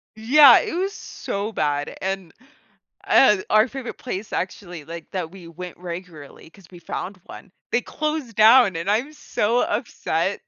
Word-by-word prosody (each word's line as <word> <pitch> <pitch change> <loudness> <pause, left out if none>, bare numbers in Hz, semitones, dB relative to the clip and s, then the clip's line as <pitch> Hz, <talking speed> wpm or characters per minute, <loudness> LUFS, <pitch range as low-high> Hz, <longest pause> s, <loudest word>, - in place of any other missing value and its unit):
Yeah, 255 +4 +7
it - - -4
was 385 +3 -1
so 205 - -5
bad, 145 -3 -1
and, 190 -3 -4 0.7
uh, 210 -7 +6
our 215 +3 +4
favorite 265 -3 -7
place 215 -4 -6
actually, 180 -3 -5
like, 165 +1 -9
that 180 -3 -4
we 185 -3 -12
went 180 +2 -9
regularly 170 -4 -9
'cause 195 0 -19
we 175 -2 -13
found 185 +3 -6
one, 200 - -12 0.2
they 240 - +2
closed 300 -7 -4
down 220 -2 +6
and 170 +4 -3
I'm 260 +8 -1
so 235 -5 -1
upset. 200 -5 -2
195 Hz, 155 wpm, -22 LUFS, 175-240 Hz, 0.7 s, Yeah